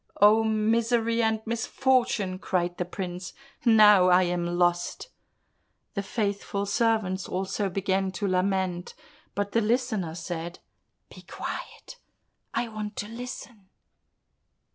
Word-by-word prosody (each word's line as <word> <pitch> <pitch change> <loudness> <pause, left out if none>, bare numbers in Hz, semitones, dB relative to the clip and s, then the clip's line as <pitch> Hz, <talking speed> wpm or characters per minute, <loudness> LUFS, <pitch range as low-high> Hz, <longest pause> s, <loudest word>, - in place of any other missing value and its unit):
"Oh, 215 +2 +6
misery 230 +1 +1
and 220 -1 +1
misfortune!" 230 -4 0
cried 175 -2 -1
the 180 - -1
prince, 180 0 -6 0.3
"now 210 -5 +7
I 180 +1 +6
am 175 -1 -1
lost!" 175 - 0 0.8
The 200 - -1
faithful 200 -1 -2
servants 205 -3 0
also 195 +2 -2
began 190 0 0
to 200 +2 -2
lament, 185 -1 -1 0.4
but 205 0 -2
the 230 - +2
Listener 220 -7 0
said, 170 0 -5 0.6
"Be - - -12
quiet, - - -7 0.5
I 240 - -1
want 215 -1 -6
to 205 - -4
listen." 230 -4 -8
200 Hz, 115 wpm, -27 LUFS, 185-225 Hz, 0.8 s, now